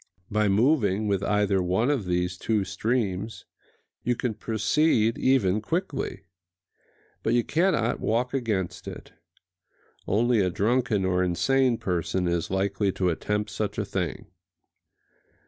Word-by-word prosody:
By 105 0 +2
moving 110 -2 +2
with 100 -2 +1
either 100 -1 +1
one 95 +9 +1
of 130 -9 -1
these 90 0 -1
two 105 +2 0
streams 105 0 -2 0.6
you 125 - 0
can 120 -1 -2
proceed 115 +2 +1
even 110 -7 +2
quickly; 150 - -3 1.0
but 115 - +1
you 120 - +3
cannot 155 -8 +1
walk 120 +4 0
against 100 -9 -2
it: - - -9 0.9
only 115 +3 +2
a 95 -2 +2
drunken 110 +1 +1
or 90 -1 +1
insane 125 +8 +2
person 90 -1 -1
is 85 -1 -1
likely 100 +1 0
to 90 -1 0
attempt 105 +5 -2
such 105 -2 -3
a 105 - -1
thing. 90 -7 -3
105 Hz, 130 wpm, -26 LUFS, 95-120 Hz, 1.0 s, you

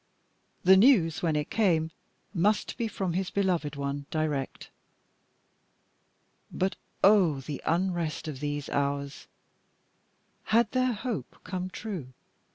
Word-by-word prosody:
The 190 +1 +7
news, 190 - +5
when 160 -3 +1
it 150 -1 -2
came, 165 -7 +2 0.4
must 205 +3 +1
be 235 -2 -1
from 190 -5 -3
his 185 +1 -1
beloved 175 -7 0
one 140 0 -4
direct. 150 -4 -3 1.8
But 190 +1 -1 0.3
oh! 185 -9 +5
the 140 +1 -6
unrest 170 -2 0
of 145 -4 -5
these 145 -1 -3
hours. 140 0 -2 1.2
Had 220 0 +3
their 255 -1 +2
hope 230 +1 -4
come 185 -1 -4
true? 180 - -6
170 Hz, 115 wpm, -28 LUFS, 145-200 Hz, 1.8 s, The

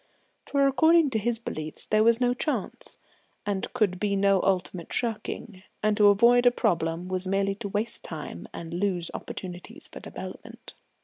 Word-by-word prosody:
For 280 -1 +2
according 315 +3 +4
to 220 - +1
his 235 +2 0
beliefs 155 -9 -2
there 215 0 +3
was 230 +1 +5
no 245 -1 +2
Chance, 300 +4 -3 0.5
and 200 -2 -2
could 205 -7 +1
be 205 0 0
no 195 -1 +3
ultimate 185 -2 -1
shirking, 220 -3 -3 0.2
and 215 0 +3
to 210 - +6
avoid 235 +4 +5
a - - +7
problem 165 -5 0
was 185 0 -2
merely 195 +1 +1
to 205 - -2
waste 210 +3 -3
time 150 - -7
and 165 0 -7
lose 180 -2 -1
opportunities 185 - -7
for - - -10
development. - - -9
205 Hz, 165 wpm, -27 LUFS, 185-235 Hz, 0.5 s, a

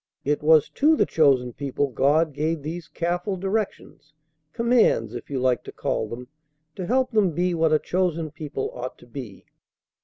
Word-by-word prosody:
It 145 +1 0
was 155 -1 +5
to 310 +3 +3
the - - +3
chosen 135 -6 +2
people 140 +1 -2
God 150 +5 +2
gave 155 +1 -2
these 165 +3 -5
careful 180 +3 -2
directions 190 -6 -4 0.4
commands, 230 - +2
if 120 - -8
you 135 -2 -2
like 125 -1 +1
to - - -7
call 110 - -2
them 125 +2 -7 0.5
to 185 -2 -5
help 255 +2 +1
them 205 -7 +2
be 175 +3 0
what 165 -1 +2
a 155 - +5
chosen 170 -2 -1
people 145 -3 -5
ought 125 +1 -6
to - - -17
be. 120 -5 -9
155 Hz, 175 wpm, -24 LUFS, 135-180 Hz, 0.5 s, was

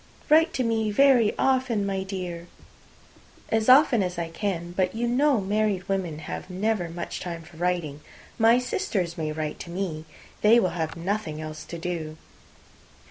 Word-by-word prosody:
"Write 320 +2 +5
to 260 - -1
me 225 -2 0
very 245 -1 +4
often, 255 -6 +1
my 195 -1 -1
dear." 180 -3 -5 1.0
"As 220 +1 +1
often 255 -4 +6
as 180 -2 -2
I 170 -1 -3
can. 175 -1 -3
But 185 +2 -1
you 240 +1 -1
know 265 +1 +3
married 200 -1 0
women 185 -5 -2
have - - -6
never 190 -1 -1
much 170 +1 -5
time 170 -2 -6
for 160 0 -16
writing. 170 -4 -2 0.4
My 230 +2 +6
sisters 215 - -2
may 155 -3 -3
write 155 -1 -4
to - - -8
me. 170 -3 -4 0.4
They 225 +3 +6
will 185 - +2
have 160 -2 -4
nothing 175 -3 -3
else 155 0 -7
to 170 - -7
do." 165 -2 -4
190 Hz, 165 wpm, -26 LUFS, 170-225 Hz, 1.0 s, often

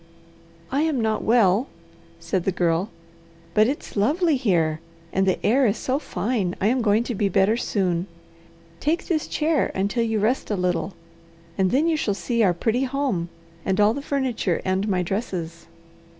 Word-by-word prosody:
"I 275 +3 +1
am 310 -4 +1
not 220 -1 0
well," 225 +1 +3 0.5
said 190 -3 -2
the 195 - +1
Girl, 175 +2 0 0.6
"but 215 +3 +4
it's 280 +3 -4
lovely 300 - +2
here, 170 - +1 0.3
and 190 0 +2
the 185 - +2
air 255 +4 +4
is 205 - 0
so 265 +2 -1
fine 210 - -2
I - - -1
am 255 +1 +1
going 215 0 +3
to 240 - -3
be 200 -1 0
better 195 +4 +3
soon. 185 -6 -1 0.7
Take 320 +4 0
this 315 -3 -1
chair 310 -1 +1
until 200 +5 0
you 225 -1 0
rest 230 +6 0
a 210 - 0
little, 180 0 -1 0.6
and 190 -1 +2
then 285 - +2
you 325 -2 +2
shall 205 -8 -1
see 235 +3 -1
our 195 -4 +5
pretty 235 +8 0
home, 255 -11 -1 0.3
and 190 +1 0
all 210 +1 +5
the 280 - -4
furniture 260 - -1
and 190 +2 0
my 185 -3 +1
dresses." 170 -4 -4
215 Hz, 175 wpm, -23 LUFS, 190-255 Hz, 0.7 s, our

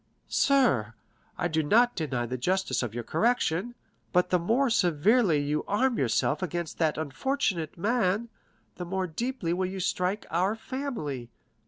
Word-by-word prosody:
"Sir, 130 - +2 0.4
I - - 0
do 160 -1 +1
not 235 +11 +3
deny 135 -7 -2
the 125 +2 -4
justice 185 +9 0
of 120 -3 -4
your 120 - -3
correction, 235 - 0 0.4
but 180 -1 +2
the 180 - +4
more 235 +9 +2
severely 185 -1 +3
you 150 +1 -1
arm 240 +5 +1
yourself 135 +4 +1
against 175 -2 -4
that 160 -2 +1
unfortunate 165 - -2
man, 215 +2 +1 0.5
the 180 - -4
more 190 +1 -1
deeply 185 0 -2
will 185 +1 0
you 190 +1 -5
strike 185 +2 -1
our 185 +6 +1
family. 220 - -5
180 Hz, 150 wpm, -28 LUFS, 155-230 Hz, 0.5 s, the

